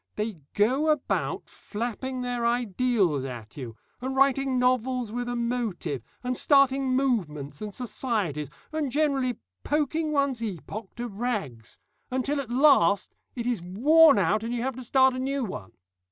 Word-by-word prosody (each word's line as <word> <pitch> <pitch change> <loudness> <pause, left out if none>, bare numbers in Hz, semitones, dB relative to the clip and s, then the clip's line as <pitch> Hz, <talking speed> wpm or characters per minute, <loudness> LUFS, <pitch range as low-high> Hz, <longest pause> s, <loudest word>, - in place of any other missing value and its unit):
They 210 -4 -3 0.2
go 260 +9 +2
about 300 -3 -1
flapping 245 +4 -5
their 245 -1 -2
ideals 235 - +1
at 120 -5 -8
you, 120 -5 -7 0.2
and 260 +1 -3
writing 270 -1 +3
novels 250 -2 +1
with 245 +1 -3
a 245 - -2
motive, 235 - -2 0.2
and 250 0 -1
starting 270 -1 +3
movements 150 - -1
and 210 -1 -4
societies, 210 - -2 0.2
and 310 -4 -2
generally 275 -4 +1 0.3
poking 305 +1 0
one's 280 -5 +1
epoch 205 0 -6
to 240 0 -4
rags, 200 - -4 0.3
until 275 +3 -1
at 255 - -9
last 245 - +4 0.2
it 235 -2 -4
is 240 -6 -1
worn 285 - +5
out 200 +3 +2
and 230 +2 -3
you 235 - -2
have 265 -1 -2
to 255 - -6
start 265 +2 +4
a 255 - -4
new 270 +1 -1
one. 105 - -7
245 Hz, 155 wpm, -27 LUFS, 205-265 Hz, 0.3 s, worn